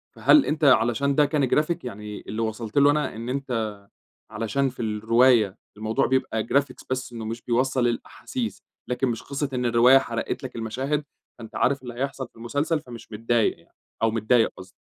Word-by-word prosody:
فهل 300 - +5
أنتَ 155 +1 -2
علشان 130 +1 +4
ده 150 - +5
كان 145 -3 +1
graphic 155 +4 +2
يعني 105 -3 -7
اللي 110 - -3
وصلت 110 0 -4
له 140 0 +7
أنا 150 -5 -1
إن 115 +2 -6
أنتَ 120 -6 -2 0.5
علشان 115 +6 0
في 125 - -8
الرواية 110 -1 +3 0.2
الموضوع 110 +1 0
بيبقى 130 -4 0
graphics 140 -1 0
بس 130 -1 -3
إنه 115 -2 -6
مش 115 +1 -5
بيوصَّل 125 +1 +1
الأحاسيس، 230 - -4 0.3
لكن 125 +1 0
مش 115 -2 -3
قصة 140 0 -3
إن 125 -1 -1
الرواية 120 +3 +6
حرقت 115 -2 -3
لَك 130 - -7
المشاهد 130 +6 -2 0.4
فأنتَ 115 -1 -10
عارف 135 +4 +1
اللي 120 -1 -7
هيحصل 130 +1 -3
في - - -42
المسلسل، 145 +7 -1
فمش 120 -5 -12
متضايق 115 +1 +1
يعني - - -27 0.3
أو 115 - +4
متضايق 115 +1 +2
قصدي؟ 95 +1 -11
120 Hz, 180 wpm, -25 LUFS, 115-135 Hz, 0.5 s, له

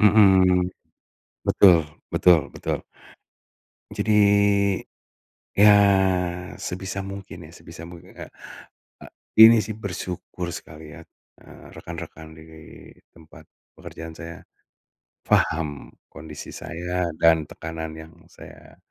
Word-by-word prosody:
mmm, 95 -4 +5 0.8
betul 90 -4 +6 0.4
betul 90 -3 +5
betul. - - -3 1.2
Jadi, 110 - -1 1.4
ya, 105 +1 +7 0.9
sebisa 95 +2 -5
mungkin 95 -4 -9
ya - - -16
sebisa 85 +1 -12
mungkin 85 -1 -14
kayak, - - -10 0.7
a - - -13 0.3
ini 110 0 +9
sih, 110 +2 -6
bersyukur 90 -2 -6
sekali 75 -2 -10
ya, - - -11 0.4
eee, - - -16
rekan-rekan 80 0 -10
di 80 0 -14 0.7
tempat 80 -2 -17 0.3
pekerjaan 80 0 -9
saya, 85 0 -9 0.8
paham 75 -4 0 0.2
kondisi 80 -2 -10
saya, 90 +1 -4
dan 80 -2 +3
tekanan 80 0 -7
yang 80 0 -12 0.2
saya, - - -15
85 Hz, 100 wpm, -23 LUFS, 80-95 Hz, 1.4 s, ini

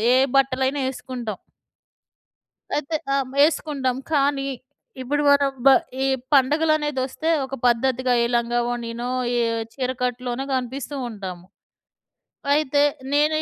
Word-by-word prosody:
ఏ - - +5 0.2
బట్టలైనా 265 +1 +1
ఏసుకుంటాం. 245 -6 -6 1.4
అయితే, 295 +2 -3 0.2
ఆహ్, 275 -2 0
యేసుకుంటాం, 285 -5 +1 0.2
కానీ 280 -1 +2 0.6
ఇప్పుడు 290 +3 0
మనం 280 -1 +4 0.2
బ - - +11 0.4
ఈ - - +2 0.3
పండగలనేదొస్తే, 295 0 +1 0.2
ఒక 265 0 -6
పద్ధతిగా 250 +1 +2
ఏ 235 - +2
లంగావోణినో, 240 0 -2 0.3
ఏ - - +3 0.3
చీరకట్టులోనో 250 -1 -2
కనిపిస్తూ 260 +2 -3
ఉంటాము. 185 -5 -8 1.1
అయితే 290 -1 +2 0.3
నేనీ 305 +2 +3
260 Hz, 100 wpm, -23 LUFS, 245-285 Hz, 1.4 s, బ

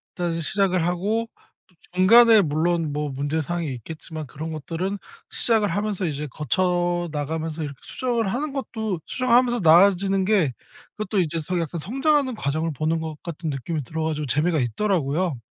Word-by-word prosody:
일단 170 -3 -2
시작을 185 +1 +1
하고 205 +6 0 0.4
또 180 - -30 0.2
중간에 225 +3 +7
물론 160 0 0
뭐 150 0 -2
문제 145 +4 -2
사항이 170 -1 -3
있겠지만 155 +5 -8
그런 155 +4 -7
것들은 165 +6 -3 0.3
시작을 220 -3 +2
하면서 200 0 -1
이제 150 -1 -3
거쳐 175 +3 0
나가면서 160 +2 -3
이렇게 140 -2 -6
수정을 240 -4 -1
하는 290 +4 -2
것도 220 - -3
수정을 255 -2 -1
하면서 245 -1 +3
나아지는 190 +3 +5
게 185 - +2 0.4
그것도 210 -1 -1
이제 165 0 -1
서 175 +3 -2
약간 165 0 -3
성장하는 270 - +1
과정을 155 +1 -1
보는 160 +4 0
것 160 -1 -5
같은 165 -1 -5
느낌이 145 +2 -3
들어 160 +4 -4
가지고 150 -1 -2
재미가 150 +4 +1
있더라고요. 160 - 0
170 Hz, 385 characters per minute, -24 LUFS, 155-200 Hz, 0.4 s, 중간에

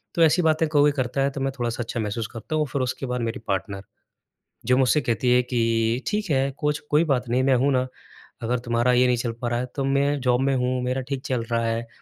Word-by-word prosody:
तो 165 - +4
ऐसी 165 +3 +4
बातें 160 -1 +2
कोई 145 -1 +4
करता 135 -1 -2
है 135 - +2
तो 135 - -6
मैं 135 0 0
थोड़ा-सा 120 0 -2
अच्छा 115 - -5
महसूस 110 +1 -2
करता 115 +6 -5
हूँ। 155 - +2
और - - -4
फिर 140 - -1
उसके 130 +1 -2
बाद 125 -1 -2
मेरी 115 +2 -3
पार्टनर, 100 0 -3 0.8
जो 125 0 +3
मुझसे 135 +3 +3
कहती 125 0 0
है 125 - +5
कि 115 0 0
"ठीक 210 -2 -1
है, 135 0 +2
कुछ 150 0 -1
कोई 150 +2 +4
बात 125 -2 -2
नहीं, 125 +2 +2
मैं 135 0 +4
हूँ 135 +3 +2
ना। 130 0 +1 0.6
अगर 120 +2 0
तुम्हारा 120 +1 +1
ये 125 +1 +4
नहीं 125 -1 +2
चल 120 0 -2
पा 120 - -1
रहा 120 0 0
है 125 - -2
तो 140 - -1
मैं 140 +1 +1
जॉब 125 0 +2
में 135 0 +2
हूँ 125 0 0
मेरा 125 +1 -1
ठीक 135 -2 -2
चल 125 -3 -1
रहा 115 0 +1
है। 115 +1 -2
125 Hz, 255 wpm, -24 LUFS, 120-140 Hz, 0.8 s, है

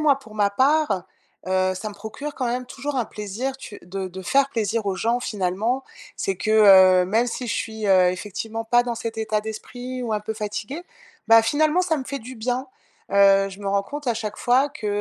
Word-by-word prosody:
moi, 285 -3 +3
pour 225 -5 -15
ma 205 -1 +2
part, 270 - +2 0.4
heu, 185 0 +1
ça 215 +4 -5
me 210 - -10
procure 275 +8 -7
quand 255 - -2
même 250 +1 -2
toujours 275 +3 -5
un 245 - +1
plaisir 215 +7 -5
tu 210 -5 -10
de 190 +2 -5
de 190 +1 -9
faire 275 +8 +3
plaisir 225 -3 -1
aux 195 -1 -1
gens 235 +4 0
finalement. 215 +5 -1 0.3
C'est 195 - -2
que, 215 +4 -2
heu, 190 -4 +7
même 225 +5 +1
si 245 +1 -4
je 220 - -1
suis, 220 -1 -3
heu, 185 -2 +5
effectivement 210 +4 -5
pas 240 +2 +4
dans 240 -1 -3
cet 225 0 -5
état 215 -1 0
d'esprit 245 +4 -6
ou 230 -3 -2
un 210 - +1
peu 220 +1 -5
fatigué, 215 +8 -5 0.5
bah, 225 0 +8
finalement, 305 +8 +2
ça 345 -3 +1
me 270 - -4
fait 275 +1 -4
du 255 +2 -10
bien. 245 +3 -2 0.5
Heu, 195 0 +5
je 195 +1 -11
me 200 - -3
rends 200 0 +1
compte 290 +7 -8
à 240 - +2
chaque 215 -1 -5
fois 260 +4 +3
que, 225 - -7
220 Hz, 220 wpm, -23 LUFS, 200-255 Hz, 0.5 s, bah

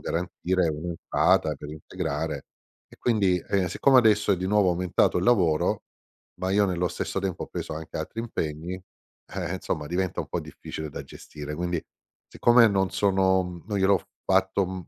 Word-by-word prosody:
garantire 90 0 -1
un'entrata 80 -1 +1
per 75 +2 -9
integrare. 80 -2 -4 0.4
E - - -17
quindi, 100 -7 +2
ehm, 95 -2 +2
siccome 130 +8 +4
adesso 105 -3 +4
è - - +2
di 95 - -2
nuovo 100 -2 +3
aumentato 90 0 +2
il 90 - -1
lavoro, 90 -10 +3 0.6
ma 95 - -1
io 100 +1 +4
nello 90 -1 0
stesso 95 - -3
tempo 95 -2 -2
ho - - -14
preso - - -5
anche 80 +1 -7
altri 115 - -4
impegni, 85 -6 -4 0.5
eh, - - -3
insomma 75 -1 -3
diventa 90 +2 -1
un - - -6
po' - - -2
difficile 80 -1 -7
da - - -6
gestire. 75 0 -8
Quindi, 85 -1 -2 0.5
siccome 120 -1 +5
non 95 -1 +1
sono 95 -3 +1
non 105 -2 -1
gliel'ho 95 0 +4 0.2
fatto, 95 +1 +2
m 95 -1 -6
90 Hz, 165 wpm, -26 LUFS, 80-100 Hz, 0.6 s, siccome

